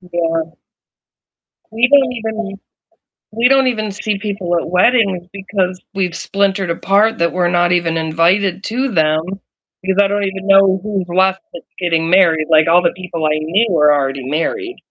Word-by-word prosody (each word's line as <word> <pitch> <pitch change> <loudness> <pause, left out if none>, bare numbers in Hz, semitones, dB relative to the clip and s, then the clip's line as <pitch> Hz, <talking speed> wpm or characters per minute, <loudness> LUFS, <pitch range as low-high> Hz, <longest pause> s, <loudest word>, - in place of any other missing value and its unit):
Yeah. 165 -2 -3 1.2
We 230 +2 +2
don't 270 -3 +4
even 220 -3 -5 0.8
we 235 +3 +2
don't 270 -1 +3
even 215 -4 -1
see 205 +1 -3
people 195 -4 -3
at 165 - -3
weddings 185 -2 +2
because 190 -2 -3
we've 185 -3 -2
splintered 195 -1 -1
apart 200 +5 +1
that 170 0 0
we're 175 -1 0
not 175 0 +2
even 170 -2 0
invited 170 +4 0
to 255 +5 -2
them, 155 -3 +2 0.6
because 190 +1 -1
I 200 - +4
don't 205 +1 -1
even 195 0 -4
know 195 -1 +4
who's 200 -3 -2
left 190 +2 +1
that's - - -10 0.2
getting 165 -2 0
married, 170 -4 +3
like, 155 -1 +4
all 175 +2 +5
the 170 - +1
people 170 -4 -4
I 150 - +1
knew 185 +9 +1
were 150 -4 +4
already 135 -2 -1
married, 360 - -3
185 Hz, 165 wpm, -16 LUFS, 170-205 Hz, 1.2 s, all